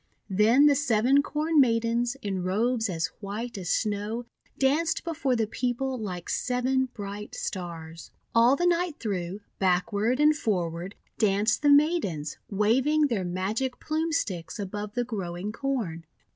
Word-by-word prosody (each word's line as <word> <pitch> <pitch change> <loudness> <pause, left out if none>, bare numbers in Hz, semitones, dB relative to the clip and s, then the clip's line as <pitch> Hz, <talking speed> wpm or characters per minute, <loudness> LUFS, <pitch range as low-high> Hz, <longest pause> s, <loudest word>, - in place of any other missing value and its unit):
Then 220 +8 +5
the 295 - +7
Seven 265 0 +3
Corn 305 +2 +1
Maidens, 235 +1 +1
in 195 -2 -2
robes 220 +5 0
as 165 -2 -2
white 220 +4 -5
as 185 -4 -5
Snow, 215 +3 -1 0.3
danced 310 +5 +1
before 315 -6 0
the 225 -2 +1
people 250 +4 -2
like 185 -7 -5
seven 255 +1 0
bright 205 -1 -7
Stars. 165 -3 -6 0.2
All 235 +3 +5
the 350 - 0
night 350 -2 +1
through, 195 -2 -3 0.2
backward 200 +6 +1
and 300 +1 +5
forward, 180 - -2 0.2
danced 205 +1 +2
the 290 - +4
Maidens, 285 - +2
waving 265 +9 +2
their 215 -6 0
Magic 200 +9 -2
Plume 315 +2 -1
Sticks 175 - -2
above 205 +1 -5
the 245 - +1
growing 195 -4 -4
Corn. 220 -10 -3
225 Hz, 140 wpm, -27 LUFS, 195-265 Hz, 0.3 s, the